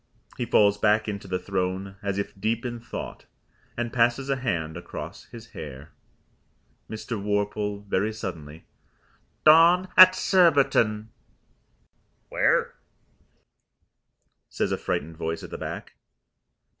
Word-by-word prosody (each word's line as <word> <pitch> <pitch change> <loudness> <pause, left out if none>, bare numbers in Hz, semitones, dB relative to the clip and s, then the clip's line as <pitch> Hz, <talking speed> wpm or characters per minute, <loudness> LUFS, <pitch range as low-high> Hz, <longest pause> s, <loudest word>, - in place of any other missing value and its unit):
He 120 - -4
falls 105 -1 +3
back 105 +1 +2
into 100 -2 -5
the 90 - -1
throne 95 0 -3
as 100 -1 -3
if 100 - -3
deep 115 +3 -1
in 120 -1 -4
thought, 115 - -8 0.5
and 120 -1 -3
passes 120 +3 +1
a 135 - +1
hand 85 -11 -2
across 85 - -8
his 115 0 -12
hair. 70 -1 -9 1.0
Mr. 110 0 -5
Worple 105 0 -2
(very 100 +2 0
suddenly) 85 -8 -8 0.8
"Dawn 170 +4 +6
at 185 0 +9
Surbiton." 135 - +3 1.2
"Where?" - - +1 1.8
says - - -2
a - - 0
frightened 80 +2 -3
voice 80 0 -4
at - - -10
the - - -6
back. - - -7
105 Hz, 120 wpm, -25 LUFS, 95-120 Hz, 1.8 s, at